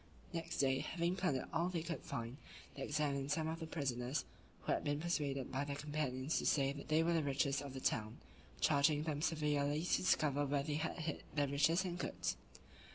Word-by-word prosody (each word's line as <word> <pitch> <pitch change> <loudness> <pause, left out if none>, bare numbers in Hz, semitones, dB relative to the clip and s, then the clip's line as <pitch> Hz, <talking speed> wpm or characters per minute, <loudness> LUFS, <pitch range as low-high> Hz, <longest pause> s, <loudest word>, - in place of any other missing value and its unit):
Next 165 0 -3
day, 135 -1 +3
having 170 +1 0
plundered 180 -9 0
all 170 +2 +2
they 170 -3 -2
could 170 0 -3
find, 115 +2 -4 0.4
they 135 - -8
examined 145 -1 0
some 155 +1 +1
of 160 +1 -3
the 160 - -5
prisoners 135 -3 -1 0.4
(who - - -1
had - - +1
been 145 0 0
persuaded 145 -6 -1
by 135 +2 0
their 140 0 -3
companions 145 -1 -1
to - - -3
say 140 -2 +3
they 155 +3 +1
were 170 +1 +2
the 165 - +3
richest 140 -1 +1
of 140 -2 -7
the - - -3
town), 110 -3 0 0.4
charging 150 0 +4
them 150 -2 -2
severely 150 -1 +1
to 180 - +3
discover 145 -5 +2
where 140 0 +1
they 150 +1 -2
had 155 +4 -1
hid 155 -2 -3
their 145 -1 +3
riches 160 +6 +3
and 175 -1 -3
goods. - - -1
145 Hz, 200 wpm, -38 LUFS, 140-160 Hz, 0.4 s, charging